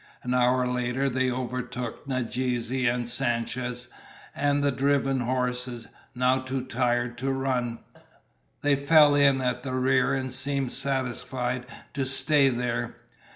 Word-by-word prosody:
An 125 - -1
hour 125 0 +3
later 125 +2 -1
they 130 0 +1
overtook 125 0 -4
Nadeze 125 -2 -2 0.2
and 120 0 -1
Sanchez, 120 0 -2 0.5
and 145 0 +1
the 140 - +3
driven 135 0 +1
horses, 125 -1 -2 0.3
now 125 +1 +2
too 130 0 -3
tired 120 -1 -1
to 135 +2 -1
run. 130 -3 -1 0.9
They 145 -1 +4
fell 145 +1 +5
in 140 -2 +4
at 125 -1 -1
the 130 -2 -4
rear 130 +1 +2
and 130 -1 -3
seemed 135 0 -1
satisfied 125 -1 -2 0.3
to 135 -2 -1
stay 140 +1 +4
there. 125 -1 -2
130 Hz, 130 wpm, -26 LUFS, 125-135 Hz, 0.9 s, fell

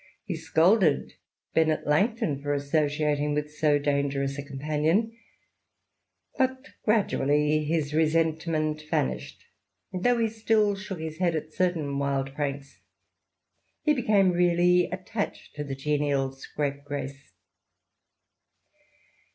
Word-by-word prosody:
He - - -3
scolded 170 -1 +3 0.4
Bennet 160 -1 +2
Langton 150 - +1
for 145 0 -1
associating 150 0 0
with 150 0 -3
so 150 -1 +3
dangerous 140 -1 0
a - - -1
companion, 155 +10 0 1.2
but 260 +2 0
gradually 150 -8 +2
his 150 -2 -1
resentment 155 -1 +1
vanished, 65 0 -2 0.5
and 185 0 -4
though 245 0 +4
he 230 -1 +2
still 215 -2 +1
shook 195 -2 -7
his 160 0 -6
head 175 -3 +2
at 155 0 -4
certain 160 -7 0
wild 135 -1 -1
pranks, 140 -1 -4 1.0
he 300 - +4
became 210 -8 +3
really 175 0 +3
attached 190 +4 -4
to 150 - -3
the 140 -2 -5
genial 140 -1 0
scrapegrace. 140 0 -5
155 Hz, 110 wpm, -27 LUFS, 145-180 Hz, 1.2 s, though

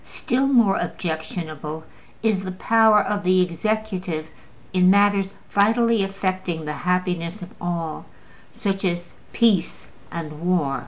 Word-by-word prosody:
Still 260 +3 -1
more 235 -8 +4
objectionable 160 -2 -4 0.4
is 220 -4 +2
the 190 -1 -5
power 220 +2 +4
of 205 -1 -2
the 185 0 +4
executive 180 -3 -3 0.4
in 185 0 +5
matters 200 0 +3 0.2
vitally 225 +2 +3
affecting 185 -4 -2
the 150 - -3
happiness 180 +2 -1
of 180 - -11
all, 170 -2 -3 0.5
such 195 -1 -2
as 175 -2 -2 0.2
peace 225 -6 +1 0.2
and 155 -2 -6
war. 170 -6 +1
185 Hz, 120 wpm, -23 LUFS, 170-205 Hz, 0.5 s, in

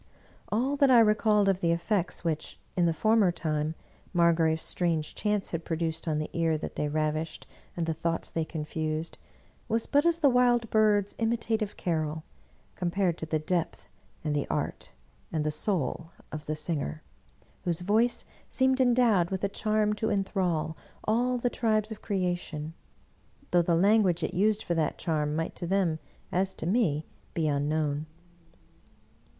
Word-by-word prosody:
All 260 +6 +1
that 280 -1 +5
I 250 -2 +8
recalled 215 -2 +4
of 195 -1 +2
the 170 - +2
effects 175 +2 -1
which, 160 -3 -3 0.2
in 175 -2 +3
the - - +3
former 215 +2 +3
time, 155 -1 -2 0.4
Margrave's 165 -2 +3
strange 165 -4 -1
chants 210 -2 -1
had 165 -1 -3
produced 165 0 -2
on 155 -1 +1
the 155 - -3
ear 165 -2 +1
that 155 - -6
they 150 - -1
ravished 155 +1 -2 0.3
and 170 - 0
the 165 - 0
thoughts 165 +1 -2
they 165 - 0
confused, 155 0 -4 0.5
was 225 +1 0
but 285 0 +3
as 340 -1 +3
the 315 -4 +4
wild 245 -3 +3
bird's 210 -2 +3
imitative 225 -2 0
carol, 155 -2 -1 0.5
compared 180 0 0
to 160 - -4
the 155 - +1
depth 165 +2 -2 0.4
and 150 -2 -1
the 145 - -1
art - - -3 0.4
and 155 -2 -1
the 155 - +1
soul 165 -2 -1 0.2
of 150 0 -7
the 155 - -1
singer, 150 - -3 0.6
whose 175 -1 -1
voice 220 +6 +2 0.2
seemed 260 0 +2
endowed 235 -8 +4
with 190 0 -3
a 200 - +2
charm 215 +1 +1
to 215 +1 -2
inthrall 185 -6 0 0.3
all 245 +3 +1
the 245 - 0
tribes 220 -3 0
of 215 - -7
creation, 175 -5 -2 0.8
though 175 - +5
the 170 0 +2
language 195 -1 +3
it - - -2
used 210 +3 +2
for 175 - -1
that 160 -2 0
charm 150 -3 -1
might 165 +1 -2
to 175 - -3
them, 180 -4 +1 0.3
as 190 +1 0
to - - -5
me, 165 -7 +1 0.3
be 160 -2 +1
unknown. 150 +1 0
175 Hz, 160 wpm, -28 LUFS, 160-215 Hz, 0.8 s, I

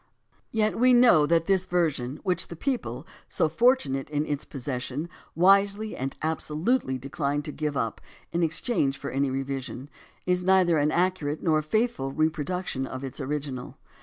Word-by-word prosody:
Yet 215 -1 0
we 250 +1 +6
know 235 -12 +6
that 165 +1 +3
this 190 -1 +1
version, 150 -6 0
which 185 -1 0
the 170 - -8
people, 255 - -3 0.2
so - - +1
fortunate 235 - +2
in 150 0 -1
its 145 -1 -3
possession, 135 +2 -4 0.3
wisely 200 +4 +3
and 135 +1 -4
absolutely 160 - 0
decline 140 +2 -2
to 150 - -5
give 150 -1 -3
up 115 -3 -2 0.3
in 170 - 0
exchange 155 - 0
for - - -6
any 140 +1 +1
revision, 135 0 -4 0.3
is 180 0 +2
neither 185 -3 +4
an 145 +1 +2
accurate 165 -3 0
nor 155 -2 +3
a - - -1
faithful 185 - 0
repro 155 +1 0
duction 180 -7 -3
of 130 +1 -6
its 135 +2 -5
original. 140 -2 -4
155 Hz, 165 wpm, -26 LUFS, 135-185 Hz, 0.3 s, we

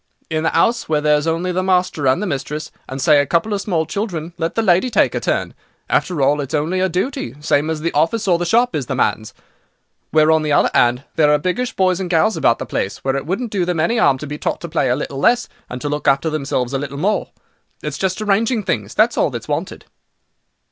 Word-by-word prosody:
In 155 0 0
the 160 - 0
'ouse, 230 -5 +1
where 155 -1 +2
there's 150 +1 +2
only 165 +3 0
the 180 +1 0
master 180 -6 +1
and 130 +10 +2
the - - -1
mistress, 150 -2 -4 0.2
and, 135 - -5
say 145 +2 +5
a - - -1
couple 170 +6 +1
of 200 - -1
small 170 -6 0
children, 170 -2 -4
let 165 0 -2
the 225 - +1
lady 185 +5 +3
take 230 - +2
her - - -1
turn. - - -1 0.4
After 165 -7 +1
all, 145 +2 +2
it's 140 +1 -3
only 160 +5 0
her 190 0 +1
duty, 180 - -3
same 150 +1 +1
as 160 -1 -2
the 170 +1 -1
office 195 +9 0
or 175 -2 +3
the - - -1
shop 240 +5 +2
is 135 -5 -2
the - - -2
man's. 110 -1 0 0.8
Where, 155 0 +4
on 160 0 +3
the 150 -1 0
other - - +3
'and, 120 +2 +3
there 150 -2 +4
are 150 - +5
biggish 185 - -2
boys 185 -1 +2
and 185 -2 -3
gals 185 +6 +2
about 115 - +2
the - - -5
place, 95 - -3
well 135 0 0
it 140 +1 -4
wouldn't 215 +6 -2
do 195 -4 0
them 175 -2 -1
any 225 +9 +1
'arm 135 - +4
to 150 - -7
be 150 +1 -6
taught - - -2
to 170 - -5
play 155 -5 0
a 125 - +2
little 135 0 -5
less, 240 - +3 0.2
and 125 - -6
to - - -3
look 150 0 -3
after 140 +4 +2
themselves 135 -4 -2
a 135 - 0
little 140 0 -5
more. 200 +8 0 0.5
It's - - -4
just 190 +2 -1
arranging 215 +2 +1
things—that's 110 - 0
all - - +3
that's - - -7
wanted." - - -4
160 Hz, 245 wpm, -19 LUFS, 145-185 Hz, 0.8 s, say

